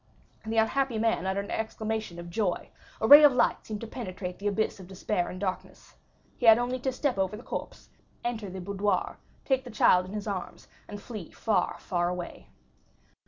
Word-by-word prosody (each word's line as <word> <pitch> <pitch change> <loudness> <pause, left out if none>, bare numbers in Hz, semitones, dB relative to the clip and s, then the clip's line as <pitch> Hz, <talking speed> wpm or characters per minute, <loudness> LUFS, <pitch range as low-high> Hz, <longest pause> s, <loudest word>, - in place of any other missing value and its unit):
The 225 +1 -2
unhappy 235 +2 +2
man 220 -4 +1
uttered 195 +1 -1
an - - -8
exclamation 220 -4 -3
of 170 0 -8
joy; 190 -2 -1 0.3
a 220 - +1
ray 290 +3 +11
of 290 -3 +8
light 250 - +2
seemed 210 -2 -5
to 230 - -6
penetrate 185 -6 -6
the 205 - -2
abyss 205 0 0
of 185 - -10
despair 185 -1 -2
and 185 - -7
darkness. 185 -1 -5 0.5
He 245 - +1
had 225 0 +10
only 245 +1 -1
to 265 +1 -1
step 255 -4 -1
over 190 +2 0
the 235 - -11
corpse, - - -7 0.3
enter 230 -4 -3
the 185 0 -7
boudoir, 200 +2 -1 0.3
take 265 -1 +1
the 250 - -9
child 185 -4 +4
in 190 - -9
his 210 -1 -4
arms, 195 -4 -5 0.2
and 205 - -7
flee 205 -6 -8
far, 220 -2 0
far 175 -2 -1
away. 180 -1 -6
210 Hz, 195 wpm, -28 LUFS, 185-230 Hz, 0.5 s, ray